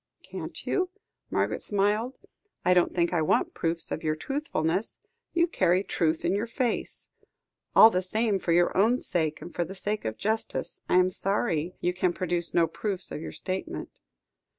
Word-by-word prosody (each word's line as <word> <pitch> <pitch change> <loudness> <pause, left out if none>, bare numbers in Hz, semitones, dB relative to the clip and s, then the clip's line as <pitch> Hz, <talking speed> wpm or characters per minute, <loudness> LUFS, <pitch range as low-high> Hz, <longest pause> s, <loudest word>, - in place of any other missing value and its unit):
"Can't - - -7
you?" 370 -1 0 0.4
Margaret - - 0
smiled. 210 +5 +1 0.5
"I 180 - +5
don't 180 -1 +3
think 170 0 +1
I 170 - +2
want 155 - +1
proofs 165 0 -1
of 160 - -3
your 155 -1 +1
truthfulness; 190 - -2 0.3
you 340 0 +3
carry 185 - +2
truth 160 -4 0
in - - +2
your 205 +4 -1
face. 240 0 -2 0.7
All 225 - +10
the 185 - +1
same, 210 +2 +2
for 175 - -1
your 175 +1 +3
own 225 +6 +4
sake, 160 -9 -1
and 175 - -9
for 175 - 0
the 185 +4 -8
sake 205 +2 -2
of 110 - -3
justice, 220 +2 -1
I - - +3
am 185 0 +5
sorry 180 -4 -1
you 180 - +1
can 180 -1 +1
produce 175 -1 -2
no 170 - +4
proofs 190 +1 -2
of - - -5
your - - -6
statement." 185 0 -5
185 Hz, 175 wpm, -27 LUFS, 170-215 Hz, 0.7 s, All